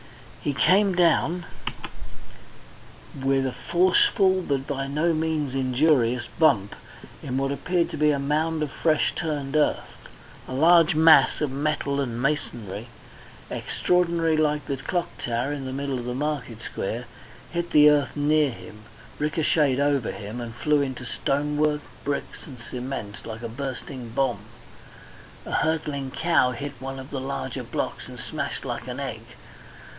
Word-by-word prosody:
He 145 - -1
came 195 +3 +4
down 175 0 +2 1.8
with 135 0 +2
a 130 - -1
forcible, 185 +3 +3
but 140 -5 -1
by 135 -1 -3
no 155 +4 +1
means 155 -4 -1
injurious, 130 -2 +2 0.2
bump 120 -12 +4 0.5
in 130 -1 -3
what 135 0 0
appeared 175 +4 0
to - - -5
be 150 0 +4
a 145 - +2
mound 155 +3 0
of 145 - -3
fresh 150 -6 +1
turned 150 -4 -3
earth. 150 - 0 0.4
A - - -6
large 165 +3 +5
mass 155 -3 +6
of 150 -3 0
metal 140 0 -1
and 120 -3 -3
masonry, 120 -6 -2 0.6
extraordinarily 170 -3 +1
like 150 -1 +1
the 140 - -2
clock 170 +6 -3
tower 120 +4 -1
in 140 -2 -5
the 130 - -4
middle 135 -1 -2
of 120 - -6
the 125 0 -3
market 135 -5 -3
square, 115 +5 -4 0.5
hit 170 0 -2
the 150 0 +7
earth 145 -2 +1
near 150 0 +3
him, 110 -3 -11 0.3
ricochetted 150 -2 +2
over 140 -4 +1
him, 105 +4 -6
and 115 -2 -7
flew 150 +3 +2
into 130 -2 -3
stonework, 150 +4 0 0.2
bricks, 140 0 -4
and 135 -4 -10
cement, 125 -3 -6
like 110 +1 -7
a - - -2
bursting 130 0 -6
bomb. 120 -2 0 1.1
A - - -7
hurtling 150 -4 0
cow 160 -2 +2
hit 140 +3 -5
one 135 +1 -6
of 130 +1 -9
the 135 - -3
larger 70 - -4
blocks - - -4
and - - -10
smashed - - -4
like - - -4
an - - -5
egg. - - -4
140 Hz, 150 wpm, -25 LUFS, 130-155 Hz, 1.8 s, the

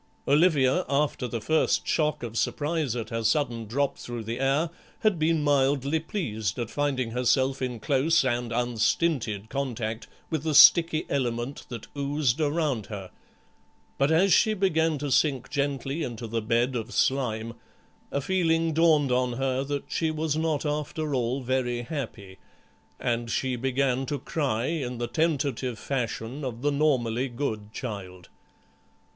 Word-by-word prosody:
Olivia, 150 +1 +4
after 140 -2 0
the 115 0 -3
first 155 +8 +1
shock 150 -3 +1
of 115 -1 -6
surprise 150 0 -1
at 115 -2 -5
her 115 0 -2
sudden 115 -1 0
drop 140 +5 -1
through 120 -2 -6
the 115 +3 -4
air, 140 +5 +1 0.3
had 215 -6 +2
been 155 -1 +2
mildly 140 +1 +2
pleased 110 - -3
at 120 -3 -3
finding 135 -5 -1
herself 130 +2 +1
in 125 -3 -3
close 145 +6 +2
and 120 -2 -1
unstinted 120 - 0
contact 120 -4 -3 0.2
with 160 -3 0
the 155 -1 -1
sticky 165 0 +7
element 120 0 -2
that 120 -3 -7
oozed 140 -1 0
around 145 -7 0
her, 100 -4 -7 0.9
but 140 +1 +3
as 175 +4 +4
she 220 -2 +4
began 165 -5 +1
to 145 0 -3
sink 135 -2 +1
gently 140 +1 -1
into 120 -5 -4
the 115 0 -2
bed 120 +3 +1
of 115 0 -4
slime 115 -5 0 0.6
a 140 - -1
feeling 165 -1 +1
dawned 155 -4 +4
on 125 0 +1
her 130 +1 -1
that 140 0 -3
she 160 - 0
was 155 -1 -1
not 160 -2 0
after 150 0 -2
all 125 +1 0
very 125 -1 -1
happy, 115 -9 -6 0.6
and 120 -1 -1
she 130 +2 0
began 130 +1 0
to 145 - -1
cry 130 -4 -1
in 135 -6 -2
the 120 - -2
tentative 135 -5 -1
fashion 125 +1 -3
of 125 -1 -5
the 145 - +2
normally 130 -4 +1
good 110 -5 -4
child. 95 -8 -7
135 Hz, 150 wpm, -27 LUFS, 120-150 Hz, 0.9 s, sticky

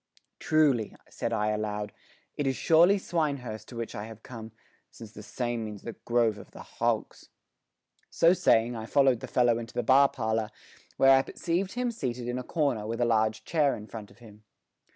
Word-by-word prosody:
"Truly," 145 -8 +2 0.2
said - - -3
I 105 0 0
aloud, 105 -1 -3 0.4
"it 145 - -2
is 135 - 0
surely 170 +8 +5
Swinehurst 140 - -3
to 125 - -11
which 115 -1 -5
I 105 - -5
have 110 0 -12
come, 115 -3 -9 0.4
since 110 -2 -12
the 110 - -11
same 120 +2 -3
means 105 -2 -8
the 115 - -6
grove 115 -3 0
of - - -13
the - - -11
hogs." - - -3 0.8
So 165 +1 +4
saying 120 -8 +2
I 110 -1 -6
followed 135 -3 +3
the - - -7
fellow 120 -2 +2
into 115 0 -9
the 120 - 0
bar 140 +1 +5
parlour, 110 -2 -2 0.5
where 135 - +6
I 135 - +4
perceived 180 +7 -3
him 245 0 -1
seated 125 - -4
in 125 +1 -2
a - - -5
corner 135 -9 -1
with 115 +1 -4
a 120 - +2
large 110 -1 +1
chair 150 -4 +2
in 105 - -9
front 110 0 -9
of 100 - -20
him. 110 -3 -16
120 Hz, 195 wpm, -28 LUFS, 110-140 Hz, 0.8 s, where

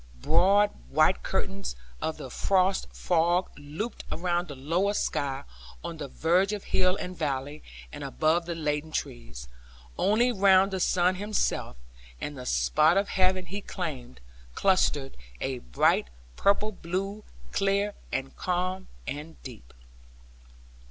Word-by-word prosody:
Broad 200 - +4 0.2
white 65 - +4
curtains 95 -7 -2 0.3
of - - -2
the - - -8
frost 190 0 +2
fog 175 +1 +1
looped 150 +11 -5
around 175 +1 0
the 145 - -7
lower 170 +10 0
sky, 140 -5 -1 0.4
on 170 -1 -5
the 145 -2 -5
verge 180 +8 +2
of 205 - -4
hill 185 0 +2
and 180 -1 -5
valley, 145 -1 -2 0.3
and - - -6
above 165 - +1
the 170 - -2
laden 150 -1 -2
trees. 115 - -5 0.5
Only 220 +6 +3
round 195 -2 +5
the 190 - -2
sun 180 0 +2
himself, 205 - -1 0.4
and 145 - -4
the 125 -2 -7
spot 155 +4 +3
of 200 +1 +1
heaven 185 -1 +2
he 195 +4 -5
claimed, 140 -11 -5 0.4
clustered 150 -8 +2 0.2
a - - -2
bright - - +2 0.3
purple 205 +2 +2
blue, 195 +3 -4 0.3
clear, 200 +1 +1 0.2
and 135 0 -3
calm, 185 +1 -1 0.2
and 155 +3 -6
deep. 115 - -10
175 Hz, 130 wpm, -28 LUFS, 145-195 Hz, 0.5 s, round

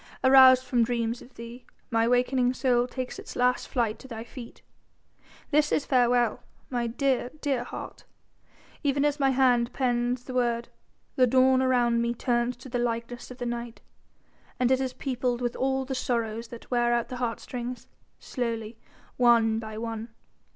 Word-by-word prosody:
Aroused 260 -1 +8
from 245 -2 +2
dreams 235 0 -1
of 255 - -16
thee, 235 +2 -9 0.3
my 230 0 +2
wakening 250 +1 +2
soul 245 -1 +2
takes 255 0 -5
its - - -9
last 250 0 +1
flight 230 -4 -1
to 265 - -12
thy 225 -3 -7
feet. 240 0 -11 0.9
This 300 0 +3
is 290 - +1
farewell, 245 -3 +2 0.3
my 240 -2 -1
dear, 250 +1 0
dear 275 -5 -1
heart, - - -8 0.8
even 280 0 +1
as 295 0 0
my 270 -1 +3
hand 250 -2 +3
pens 245 -1 0
the 255 - -8
word 240 -2 0 0.5
the 255 -1 +5
dawn 260 +1 +4
around 240 -2 +2
me 235 0 -1
turns 240 0 0
to 255 - -12
the 245 -1 -2
likeness 235 0 -3
of 255 - -10
the 245 - -4
night, 235 -1 -5 0.8
and 250 0 +2
it 260 0 +3
is 260 -1 -2
peopled 250 -2 -2
with 240 -1 -2
all 265 0 0
the 265 - -4
sorrows 230 -3 -2
that 235 +2 -12
wear 240 -1 +2
out 235 0 -1
the 255 - -5
heartstrings 245 0 -4 0.3
slowly, 230 -2 -4 0.4
one 230 -2 +4
by 220 -1 -7
one. 225 0 -5
245 Hz, 165 wpm, -27 LUFS, 235-255 Hz, 0.9 s, Aroused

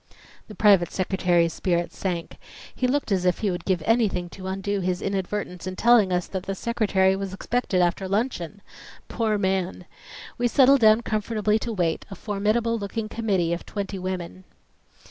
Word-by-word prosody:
The 210 - -10
private 200 -5 +4
secretary's 175 -3 +1
spirits 175 -2 -1
sank. 175 -3 -4 0.4
He 255 - 0
looked 275 -3 -1
as 185 -2 +1
if 180 -1 +2
he 205 -3 +1
would 175 - -5
give 180 -4 0
anything 210 -6 +1
to 185 +1 -9
undo 195 +1 -2
his 180 -1 -1
inadvertence 195 -2 -3
in 185 - -4
telling 230 -3 +4
us 180 -1 0
that 190 - -4
the 195 - -2
Secretary 195 -4 +1
was 195 -1 -5
expected 195 -4 0
after 175 +2 0
luncheon! 200 -3 -2 0.5
Poor 220 -2 0
man! 190 -2 -1 0.5
We 240 - +3
settled 270 +2 +5
down 220 +1 +6
comfortably 215 -1 0
to 235 - -4
wait, 175 -6 -1
a 195 - -7
formidable 215 +4 0
looking 215 +2 -4
committee 195 -8 0
of 170 - -4
twenty 200 -1 -5
women. 185 0 -5
195 Hz, 165 wpm, -24 LUFS, 180-215 Hz, 0.5 s, down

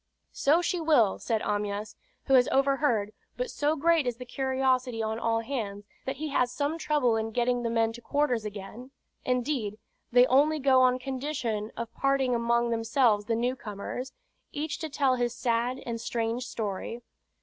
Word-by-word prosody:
"So 315 +5 +3
she 350 0 -1
will," 280 -11 +3
said 225 -2 -1
Amyas, 205 0 -2 0.3
who 270 - +1
has 255 -1 +6
overheard; 270 -6 +1 0.2
but - - -2
so 295 +2 +1
great 320 -2 +2
is 240 -2 -2
the 250 - -8
curiosity 260 -2 0
on 220 +1 -2
all 225 0 +1
hands, 215 -5 -4 0.2
that 265 - -1
he 310 0 -4
has 250 -3 +1
some 290 +5 -2
trouble 295 -7 +2
in 220 0 -2
getting 245 +2 0
the 235 - -1
men 225 -1 +1
to 240 - -10
quarters 255 -4 0
again; 210 +4 -8 0.4
indeed, 250 -4 -1 0.3
they 245 +1 +7
only 290 +5 +4
go 265 -2 +4
on 255 0 +4
condition 255 -5 -3
of 235 -1 -5
parting 275 -2 +1
among 235 0 +1
themselves 225 -2 +2
the 230 - 0
new 245 +3 0
comers, 230 +3 -6 0.4
each 295 +1 -3
to 320 - -4
tell 270 -3 +2
his 240 -1 -1
sad 240 +1 0
and 230 -1 -4
strange 235 +1 -2
story. 220 +2 -4
245 Hz, 170 wpm, -28 LUFS, 225-275 Hz, 0.4 s, they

